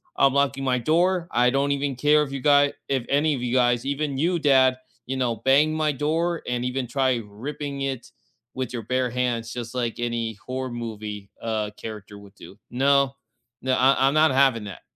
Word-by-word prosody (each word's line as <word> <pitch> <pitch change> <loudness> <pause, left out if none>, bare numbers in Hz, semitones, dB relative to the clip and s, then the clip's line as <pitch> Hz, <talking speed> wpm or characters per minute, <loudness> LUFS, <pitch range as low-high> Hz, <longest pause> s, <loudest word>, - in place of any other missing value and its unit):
I'm 135 -1 +4
locking 140 -1 +1
my 130 -1 +1
door. 170 +6 +1
I 125 +1 +3
don't 140 +2 +1
even 140 -1 -1
care 150 +4 +3
if 135 - -6
you 140 - -4
guy 145 0 +4 0.2
if 135 -3 0
any 150 +2 +2
of 125 - -6
you 120 - -2
guys, 120 -1 +2
even 140 0 -2
you, 170 +4 +1
dad, 130 -3 +4 0.3
you 135 - -2
know, 120 -4 0
bang 145 +4 +4
my 155 -1 +1
door 160 +4 -1
and 125 0 -2
even 125 0 -2
try 130 -1 0
ripping 140 +6 -6
it 135 -3 -4 0.4
with 130 -2 -4
your 120 - -3
bare 130 +3 0
hands, 120 -2 -2
just 120 0 -6
like 120 -2 -2
any 115 -1 -2
horror 130 0 -4
movie, 105 -4 -6
uh, 110 -2 -2
character 105 -2 -8
would 100 -1 -15
do. 100 - -13
No, 140 +1 +2 0.5
n 130 - -4
I 135 +1 +4
I'm 135 - +2
not 155 -2 +5
having 130 -4 +3
that." 95 -3 -9
130 Hz, 195 wpm, -24 LUFS, 120-140 Hz, 0.5 s, not